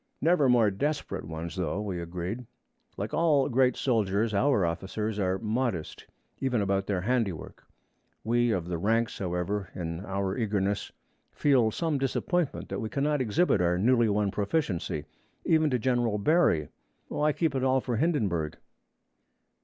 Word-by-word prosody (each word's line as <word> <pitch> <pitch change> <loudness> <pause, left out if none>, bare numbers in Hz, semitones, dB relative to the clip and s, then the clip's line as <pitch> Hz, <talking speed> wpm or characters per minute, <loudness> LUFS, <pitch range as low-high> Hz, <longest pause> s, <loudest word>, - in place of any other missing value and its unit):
Never 160 -5 +3
more 115 -4 +4
desperate 145 +10 -2
ones, 80 +1 -6
though, 90 0 -2
we 95 -4 -3
agreed. 90 +8 -5 0.5
Like - - -4
all 155 -5 +3
great 125 0 +3
soldiers, 110 -3 +1
our 105 -2 +3
officers 100 +5 -3
are 95 -1 +1
modest, 110 -5 -2 0.3
even 125 -3 0
about 100 -1 0
their 95 -3 0
handiwork. 110 -5 -2 0.6
We 120 +2 +2
of 90 -6 -1
the 85 -2 -3
ranks, 115 +5 0
however, 95 +1 -2
in 85 0 -4
our 95 -1 -2
eagerness 100 -3 -1 0.4
feel 130 -6 +3
some 155 +4 -1
disappointment 155 +4 -1
that - - -3
we 110 - -3
cannot 145 +2 0
exhibit 115 - +2
our 90 0 +2
newly 120 +3 +3
won 100 -1 +1
proficiency, 100 - -1 0.4
even 155 -1 +3
to 130 - +1
General 120 -2 +1
Barry. 105 - +2 0.4
Why 150 +1 +1
keep 160 0 0
it 130 -1 -1
all 130 0 +3
for 125 -2 -2
Hindenburg? 105 - 0
110 Hz, 145 wpm, -28 LUFS, 95-130 Hz, 0.6 s, more